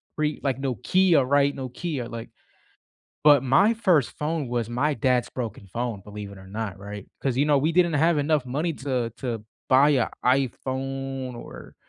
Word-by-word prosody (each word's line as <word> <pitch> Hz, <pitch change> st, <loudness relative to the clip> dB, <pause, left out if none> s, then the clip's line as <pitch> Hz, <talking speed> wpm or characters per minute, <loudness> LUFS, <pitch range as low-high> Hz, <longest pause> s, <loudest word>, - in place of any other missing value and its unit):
pre 150 Hz, -1 st, -1 dB
like, 135 Hz, -1 st, -1 dB
Nokia, 140 Hz, -, +3 dB
right? 140 Hz, +1 st, +3 dB
Nokia, 130 Hz, 0 st, -4 dB
like 115 Hz, 0 st, -7 dB, 1.0 s
but 145 Hz, -3 st, +7 dB
my 135 Hz, -, +4 dB
first 180 Hz, -, +2 dB
phone 155 Hz, -1 st, -1 dB
was 120 Hz, -2 st, -1 dB
my 140 Hz, +6 st, 0 dB
dad's 125 Hz, 0 st, +1 dB
broken 115 Hz, -5 st, -5 dB
phone, 120 Hz, -4 st, -3 dB
believe 105 Hz, -1 st, -8 dB
it 100 Hz, -, -12 dB
or 95 Hz, -, -13 dB
not, 100 Hz, -1 st, -5 dB
right? 100 Hz, 0 st, -8 dB
'Cause, 130 Hz, -3 st, -1 dB
you 140 Hz, -, +3 dB
know, 145 Hz, -2 st, +4 dB
we 155 Hz, +4 st, +1 dB
didn't 175 Hz, 0 st, +3 dB
have 160 Hz, +2 st, +3 dB
enough 145 Hz, -1 st, +1 dB
money 150 Hz, +7 st, -1 dB
to 130 Hz, -5 st, -2 dB
to 115 Hz, -5 st, -4 dB, 0.2 s
buy 135 Hz, +3 st, +6 dB
a 130 Hz, -6 st, +2 dB, 0.2 s
iPhone 135 Hz, 0 st, -1 dB
or, 120 Hz, -, -10 dB
135 Hz, 170 wpm, -25 LUFS, 120-150 Hz, 1.0 s, but